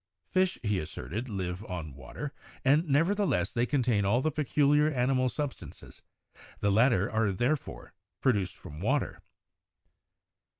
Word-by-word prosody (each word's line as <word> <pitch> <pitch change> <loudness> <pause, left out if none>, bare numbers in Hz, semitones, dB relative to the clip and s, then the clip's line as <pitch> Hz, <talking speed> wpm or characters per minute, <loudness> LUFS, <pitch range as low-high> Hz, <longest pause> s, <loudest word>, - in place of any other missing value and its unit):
Fish, 185 0 +2
he 105 -3 +1
asserted, 90 - -5
live 95 -1 -3
on 85 -7 -5
water, 70 - -7 0.3
and 150 +5 +4
nevertheless, 165 - +2
they 120 +1 +1
contain 125 -7 +2
all 100 +5 +3
the 155 +4 0
peculiar 150 0 +3
animal 130 -2 +1
sub 145 +2 -2
stances; - - -13 0.6
the 100 - +2
latter 105 -2 +4
are 110 -2 +2
therefore 120 +9 -2 0.3
produced 100 -8 +1
from 75 -4 -10
water. 130 - -1
120 Hz, 130 wpm, -29 LUFS, 95-145 Hz, 0.6 s, and